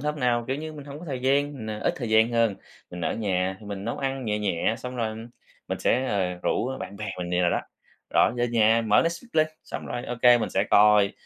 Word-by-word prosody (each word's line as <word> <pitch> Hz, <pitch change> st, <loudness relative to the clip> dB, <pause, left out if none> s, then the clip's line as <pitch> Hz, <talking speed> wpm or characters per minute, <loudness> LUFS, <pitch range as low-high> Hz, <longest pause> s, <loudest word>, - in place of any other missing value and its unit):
hôm 150 Hz, 0 st, -3 dB
nào, 120 Hz, -1 st, +1 dB
kiểu 135 Hz, -, 0 dB
như, 155 Hz, +1 st, -6 dB
mình 145 Hz, -2 st, -9 dB
hổng 145 Hz, 0 st, -8 dB
có 175 Hz, -, -10 dB
thời 135 Hz, -5 st, -4 dB
gian, 140 Hz, +2 st, +2 dB
mình, 110 Hz, -6 st, -6 dB
à, 105 Hz, -, -4 dB
ít -, -, 0 dB
thời 120 Hz, -, -4 dB
gian 110 Hz, +2 st, +5 dB
hơn, 115 Hz, -4 st, +2 dB, 0.3 s
mình 90 Hz, -, -7 dB
ở 80 Hz, -, -1 dB
nhà 95 Hz, -3 st, -1 dB
thì 105 Hz, -, -12 dB
mình 100 Hz, -1 st, -6 dB
nấu 120 Hz, -, -3 dB
ăn 135 Hz, -1 st, -2 dB
nhẹ 105 Hz, -1 st, -1 dB
nhẹ, 100 Hz, 0 st, 0 dB
xong 125 Hz, 0 st, -7 dB
rồi 110 Hz, -2 st, -2 dB, 0.5 s
mình -, -, -2 dB
sẽ, 130 Hz, +2 st, +1 dB
ờ, 95 Hz, -6 st, 0 dB
rủ 130 Hz, +2 st, 0 dB
bạn 100 Hz, -, -7 dB
bè 105 Hz, -, -5 dB
mình 90 Hz, -1 st, -4 dB
vậy 90 Hz, -, +1 dB
đồ 85 Hz, -, +3 dB
đó. -, -, 0 dB, 0.5 s
Rồi -, -, +5 dB
về 120 Hz, 0 st, +1 dB
nhà 115 Hz, 0 st, +3 dB
mở 105 Hz, 0 st, +5 dB
Netflix 170 Hz, +8 st, -3 dB
lên, 155 Hz, -1 st, +4 dB, 0.2 s
xong -, -, -6 dB
rồi 120 Hz, -, -4 dB
OK, 120 Hz, 0 st, +4 dB
mình -, -, -2 dB
sẽ 95 Hz, -, +1 dB
coi, 105 Hz, -1 st, +5 dB
115 Hz, 255 wpm, -26 LUFS, 105-130 Hz, 0.5 s, gian